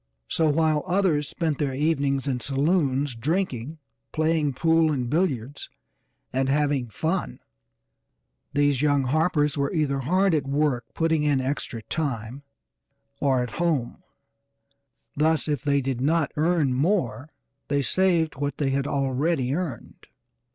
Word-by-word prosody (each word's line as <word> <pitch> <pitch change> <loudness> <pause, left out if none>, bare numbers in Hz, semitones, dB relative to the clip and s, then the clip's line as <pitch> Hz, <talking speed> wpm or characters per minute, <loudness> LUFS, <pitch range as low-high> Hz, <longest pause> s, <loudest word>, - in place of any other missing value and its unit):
So 160 -2 +1
while 155 0 +2
others 175 -6 +1
spent 160 -5 -2
their 140 -3 -1
evenings 140 -2 0
in 130 -2 -1
saloons 140 0 +1
drinking, 145 +1 -2 0.3
playing 155 -2 +1
pool 160 +2 +3
and 130 -4 -1
billiards, 145 -4 -1 0.6
and 130 +1 +1
'having 140 -3 +1
fun,' 165 - -2 1.1
these 145 -2 +2
young 145 -2 +2
Harpers 150 +1 +1
were 140 0 0
either 150 -5 0
hard 185 +7 +2
at 145 -3 0
work 140 -4 0
putting 160 -1 +1
in 145 -2 +2
extra 130 -4 -3
time, 130 -3 -3 0.8
or 130 -3 +2
at 125 - -6
home, 150 -9 -1 1.1
thus 160 +2 +1
if 145 -4 -1
they 140 -1 +2
did 130 -2 -3
not 155 +2 +1
earn 155 -3 +2
more 135 - 0 0.4
they 140 -1 +1
saved 170 -1 +2
what 145 +1 -3
they 140 -2 0
had 135 +1 0
already 135 0 0
earned. 160 -7 -5
145 Hz, 130 wpm, -25 LUFS, 135-160 Hz, 1.1 s, pool